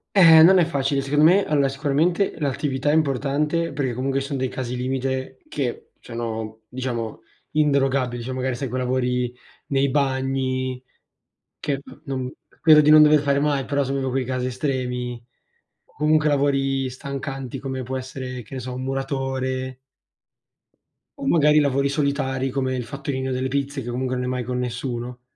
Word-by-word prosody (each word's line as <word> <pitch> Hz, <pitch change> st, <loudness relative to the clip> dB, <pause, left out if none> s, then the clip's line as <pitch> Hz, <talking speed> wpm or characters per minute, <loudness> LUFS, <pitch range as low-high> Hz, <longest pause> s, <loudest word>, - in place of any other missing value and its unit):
Eh 165 Hz, -5 st, +9 dB
non 185 Hz, +4 st, +8 dB
è 175 Hz, -, +5 dB
facile, 140 Hz, -3 st, 0 dB
secondo 145 Hz, +2 st, +3 dB
me 190 Hz, +4 st, +5 dB
allora 145 Hz, -2 st, +2 dB
sicuramente 150 Hz, +9 st, 0 dB
l'attività 140 Hz, -1 st, -1 dB
è 150 Hz, -, +3 dB
importante 150 Hz, +3 st, +1 dB
perché 130 Hz, -4 st, -2 dB
comunque 135 Hz, +2 st, -1 dB
ci 135 Hz, -, -4 dB
sono 140 Hz, -2 st, -3 dB
dei 130 Hz, -, 0 dB
casi 125 Hz, -1 st, -4 dB
limite 130 Hz, +1 st, -2 dB
che 130 Hz, -5 st, -4 dB
sono, 110 Hz, -1 st, -5 dB
diciamo, 120 Hz, -3 st, -4 dB, 0.3 s
inderogabili, 135 Hz, -5 st, +1 dB
cioè 130 Hz, -, -5 dB
magari 130 Hz, 0 st, -1 dB
sai 135 Hz, +2 st, -3 dB
coi 130 Hz, +2 st, -2 dB
lavori 125 Hz, -1 st, 0 dB, 0.4 s
nei 140 Hz, 0 st, +2 dB
bagni 130 Hz, -2 st, -1 dB, 0.8 s
che, 140 Hz, -2 st, -2 dB
mhmm, 135 Hz, -3 st, -6 dB
no 130 Hz, -, -8 dB, 0.3 s
credo 155 Hz, -2 st, +8 dB
di 150 Hz, -, +3 dB
non 155 Hz, 0 st, +9 dB
dover 150 Hz, 0 st, +6 dB
fare 140 Hz, -1 st, +2 dB
mai, 140 Hz, -2 st, +1 dB
però 140 Hz, 0 st, 0 dB
sono 135 Hz, 0 st, -1 dB
quei 130 Hz, 0 st, -1 dB
casi 130 Hz, 0 st, -2 dB
estremi, 125 Hz, -2 st, -3 dB, 0.6 s
comunque 155 Hz, 0 st, +1 dB
lavori 135 Hz, -2 st, +1 dB
stancanti 135 Hz, 0 st, -5 dB
come 130 Hz, -1 st, -4 dB
può 130 Hz, +2 st, -4 dB
essere 130 Hz, -1 st, -6 dB
che 135 Hz, -, -10 dB
ne -, -, -3 dB
so, 125 Hz, +1 st, -5 dB
un 130 Hz, +1 st, -5 dB
muratore 130 Hz, -1 st, -2 dB, 1.4 s
o -, -, -5 dB
magari 150 Hz, 0 st, +5 dB
lavori 140 Hz, -1 st, +2 dB
solitari 135 Hz, -2 st, -1 dB
come 130 Hz, -1 st, -1 dB
il 125 Hz, -, -2 dB
fattorino 130 Hz, 0 st, -3 dB
delle 130 Hz, +1 st, -1 dB
pizze, 140 Hz, +1 st, -2 dB
che 120 Hz, -, -6 dB
comunque 130 Hz, +1 st, -2 dB
non 125 Hz, 0 st, -2 dB
è -, -, -2 dB
mai 125 Hz, -1 st, -2 dB
con 125 Hz, +1 st, -3 dB
nessuno. 125 Hz, 0 st, -4 dB
135 Hz, 165 wpm, -23 LUFS, 130-140 Hz, 1.4 s, Eh